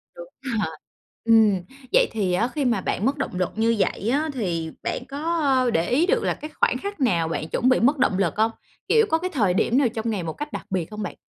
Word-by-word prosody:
Đúng - - -9 0.2
rồi. 215 - -2 0.5
Ừm, 220 -5 +5 0.3
vậy - - +5
thì 195 -5 -1
á, 225 +7 +2
khi 285 0 -2
mà 230 -6 +1
bạn 205 - -2
mất 280 +2 +1
động 270 - -3
lực 180 -1 0
như 225 +1 +2
vậy 205 +3 0
á, 300 +4 +1
thì 170 -9 -2
bạn - - -3
có, 280 - -6 0.2
ơ, 260 -4 +2
để 165 -2 0
ý 295 +8 +3
được 465 +3 +1
là - - +1
cái 305 - -8
khoảng 250 - +3
khắc 400 +4 -6
nào 175 -11 +2
bạn 160 -1 -3
chuẩn 250 - +1
bị 255 - +4
mất 280 +5 +3
động 220 -7 +2
lực 195 -1 0
hông? 220 +1 +3 0.4
Kiểu, 450 -1 +4
có 320 - +3
cái 365 +2 -3
thời 205 -9 +2
điểm 235 +6 +2
nào 275 -3 +4
trong 225 0 -3
ngày 200 -5 -2
một 160 - -4
cách 295 0 -6
đặc - - -6
biệt 185 0 -2
hông 210 0 -5
bạn? - - -5
230 Hz, 255 wpm, -24 LUFS, 190-275 Hz, 0.5 s, Ừm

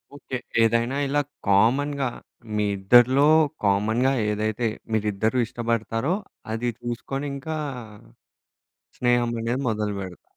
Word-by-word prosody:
Okay. 135 -2 -5 0.3
ఏదైనా 115 +4 +1
ఇలా 145 +2 +2 0.3
కామన్‌గా 135 +8 +3 0.5
మీ 105 0 +1
ఇద్దరిలో 120 +8 +5 0.4
కామన్‌గా 110 +6 +2 0.2
ఏదైతే 110 +2 -1 0.3
మీరిద్దరు 110 +2 0
ఇష్టబడతారో 115 +5 -1 0.4
అది 115 +2 -1
చూసుకొని 120 +4 -4
ఇంకా 155 +3 -5 1.4
స్నేహం 120 -1 +2
అనేది 120 +3 -1
మొదలుపెడత 100 -4 -3
115 Hz, 95 wpm, -24 LUFS, 105-130 Hz, 1.4 s, ఇద్దరిలో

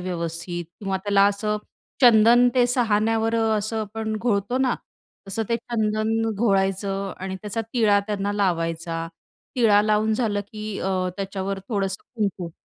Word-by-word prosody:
व्यवस्थित 175 -1 -4 0.2
किंवा 195 -1 -1
त्याला 200 -1 +4
असं 210 +1 -1 0.5
चंदन 240 +1 +7
ते 245 -1 +4
सहाणेवर 225 -2 +1
असं 220 -1 0
पण 220 -1 -2
घोळतो 215 +1 0
ना, 260 -2 +2 0.5
तसं 225 +3 -1
ते 230 - +2
चंदन 225 -1 -1
घोळायचं 195 -2 0
आणि 190 0 -4
त्याचा 210 +2 -3
टिळा 215 -4 +4
त्यांना 205 -1 -2
लावायचा. 165 -4 -1 0.5
टिळा 220 -5 +5
लावून 215 +1 +2
झालं 215 -3 0
की 215 -1 -5
अ, 185 -1 0
त्याच्यावर 195 0 -3
थोडंसं 195 -3 -2
कुंकू. 195 -5 -2
210 Hz, 135 wpm, -24 LUFS, 195-225 Hz, 0.5 s, चंदन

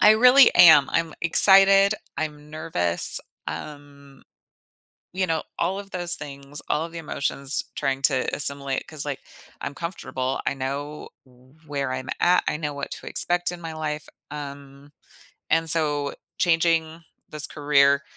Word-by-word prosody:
I 210 - +7
really 250 +4 +6
am, 155 -5 +7
I'm 165 -1 -1
excited, 195 +3 +5 0.2
I'm 150 -1 -5
nervous, 150 - 0 0.3
um, 140 - -10 0.9
you 185 0 0
know, 160 -2 -1 0.2
all 195 +2 -1
of 200 -1 -10
those 175 -1 0
things, 140 0 -7
all 155 +2 0
of 170 - -11
the 170 - -8
emotions 140 -2 -1
trying 135 -2 -2
to 130 -3 +2
assimilate 140 -1 -1
'cause, 155 -4 -1
like, 145 -2 -4 0.4
I'm 140 - -5
comfortable, 135 -5 -4
I - - 0
know 140 +3 -5 0.6
where 140 -3 -3
I'm 130 0 -6
at, 180 +1 +3
I - - -1
know 150 -2 -4
what 140 0 -6
to - - -9
expect 175 0 +1
in 175 - -8
my 165 -1 -6
life, 155 -1 -5 0.2
um, 140 -1 -10 0.6
and 165 0 +2
so 145 -3 +2 0.2
changing 165 -1 +1 0.3
this 150 -1 +2
career, 140 -1 +2
150 Hz, 145 wpm, -23 LUFS, 140-165 Hz, 0.9 s, I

